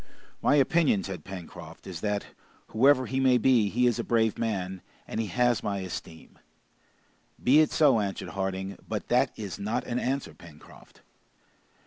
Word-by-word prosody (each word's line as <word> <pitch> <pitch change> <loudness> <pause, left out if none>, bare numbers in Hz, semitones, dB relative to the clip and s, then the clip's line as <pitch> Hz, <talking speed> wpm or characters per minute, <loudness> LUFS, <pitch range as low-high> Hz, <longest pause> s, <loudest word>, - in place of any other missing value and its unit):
"My 145 - +3
opinion," 145 - +3
said 95 -5 -6
Pencroft, 95 -3 -10
"is 90 -3 -7
that, 105 -1 -1 0.4
whoever 130 +3 +4
he 130 +1 -2
may 130 -2 +4
be, 120 -5 +3
he 125 +4 +1
is 120 -3 +2
a - - -1
brave 110 -2 +1
man, 95 -5 -3 0.3
and - - -4
he 110 - -1
has 120 +4 +1
my 100 -1 -2
esteem!" 85 -3 -8 1.0
"Be 135 +5 +6
it 155 - +3
so," 140 -7 +4
answered 100 -2 -3
Harding, 95 0 -4
"but - - -4
that - - +3
is 100 -3 -6
not 105 +3 -2
an 120 - -2
answer, 135 +2 -2
Pencroft." 80 -4 -16
110 Hz, 160 wpm, -27 LUFS, 95-125 Hz, 1.0 s, Be